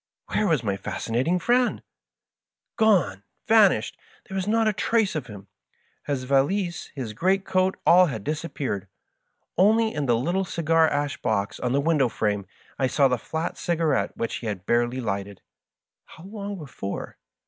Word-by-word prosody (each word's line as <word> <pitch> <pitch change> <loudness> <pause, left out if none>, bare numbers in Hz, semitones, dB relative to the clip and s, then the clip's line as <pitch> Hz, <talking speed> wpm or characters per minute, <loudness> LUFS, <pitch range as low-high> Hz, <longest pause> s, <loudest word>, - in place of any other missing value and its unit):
Where 215 - +2
was 155 -8 +1
my 100 -3 -1
Fascinating 125 - -1
Friend 245 +6 +1 0.5
% - - -65
Gone 220 -5 +4
1 100 - -30 0.2
vanished 205 - +4
1 - - -33 0.2
There 190 - -7
was 190 0 -2
not 225 +1 +2
a 215 - +2
trace 220 0 +1
of 150 -7 -4
him. 100 -3 -10 0.6
His 140 -3 -1
valise, 160 +8 0
his 120 -6 -5
great 190 - +1
coat, 185 0 +1
all 180 +1 +7
had 110 -9 -5
disappeared. 145 - -3 0.7
Only 220 +3 +4
in 145 -2 -2
the 120 -1 +3
little 175 +10 0
cigar 165 -2 +2
ash 145 -1 -2
box 105 -4 -1
on 125 - -1
the 140 - +3
window 145 -4 +2
frame 105 -3 -1 0.3
I 130 - +2
saw 135 +2 +3
the 125 -2 0
flat 160 +7 -4
cigarette 165 -4 0
which 115 - -2
he 115 - -6
had 100 -3 -4
barely 120 +3 +1
lighted 100 -3 -4 0.3
— - - -24
^how 185 +5 -12
long 205 -2 -5
before 130 - -7
150 Hz, 170 wpm, -25 LUFS, 120-190 Hz, 0.7 s, all